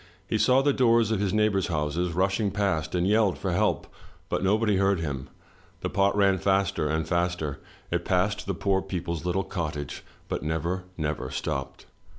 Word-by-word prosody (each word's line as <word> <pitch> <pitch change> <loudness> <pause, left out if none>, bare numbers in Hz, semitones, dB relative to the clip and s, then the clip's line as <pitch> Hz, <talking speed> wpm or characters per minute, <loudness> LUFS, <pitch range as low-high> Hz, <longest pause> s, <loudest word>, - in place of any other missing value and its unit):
He - - 0
saw 130 +1 +4
the 145 0 +3
doors 115 -4 +3
of 110 - +1
his 100 -2 0
neighbors' 105 -3 +2
houses 80 +2 -1
rushing 100 +4 +1
past, 90 -6 -1
and 90 +1 +1
yelled 105 -2 +3
for 95 - -2
help, 105 +5 +1 0.4
but - - -1
nobody 105 +1 +2
heard 95 -1 +2
him. 70 -4 -4 0.5
The - - -3
pot 100 +1 +2
ran 100 -2 +4
faster 95 -5 +1
and 80 +1 -1
faster. 85 -5 -1 0.3
It - - 0
passed 100 +3 0
the 100 - -1
poor 95 +2 +1
people's 85 -3 -4
little 90 +2 0
cottage, 75 -6 -4 0.2
but - - -3
never, 85 +4 -2
never 75 -1 -2
stopped. 70 0 -4
95 Hz, 170 wpm, -27 LUFS, 80-100 Hz, 0.5 s, saw